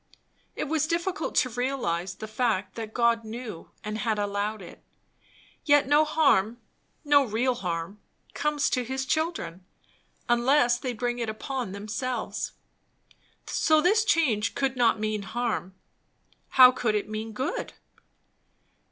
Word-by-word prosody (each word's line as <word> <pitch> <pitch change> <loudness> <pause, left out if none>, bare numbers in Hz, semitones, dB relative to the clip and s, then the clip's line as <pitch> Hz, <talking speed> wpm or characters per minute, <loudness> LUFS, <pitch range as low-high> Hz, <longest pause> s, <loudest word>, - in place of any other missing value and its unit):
It - - -2
was 310 0 0
difficult 340 +1 -2
to 255 - +3
realize 225 -8 -2
the 215 - -7
fact 215 -4 -1
that 225 -2 -6
God 235 -1 +2
knew 220 -5 -8
and 215 0 -4
had 220 0 0
allowed 205 +1 -2
it. - - -13 0.8
Yet 290 -3 +4
no 295 +2 +5
harm, 260 -9 +2 0.5
no 290 -1 +5
real 245 +2 0
harm, 180 -2 -4 0.3
comes 300 0 0
to 250 - +1
his 265 +2 -3
children, 265 - -2 0.6
unless 240 0 +3
they 255 -1 -3
bring 240 +1 -2
it 230 -2 -2
upon 245 0 -4
themselves; 220 +6 -4 0.9
so 315 -1 +3
this 410 +7 +3
change 290 - +1
could 270 -2 0
not 240 -3 +3
mean 215 -1 -1
harm. 205 -2 -3 0.7
How 255 -1 +8
could 240 -4 -1
it 210 - -1
mean 215 +1 -5
good? 265 - -3
240 Hz, 135 wpm, -27 LUFS, 215-275 Hz, 0.9 s, How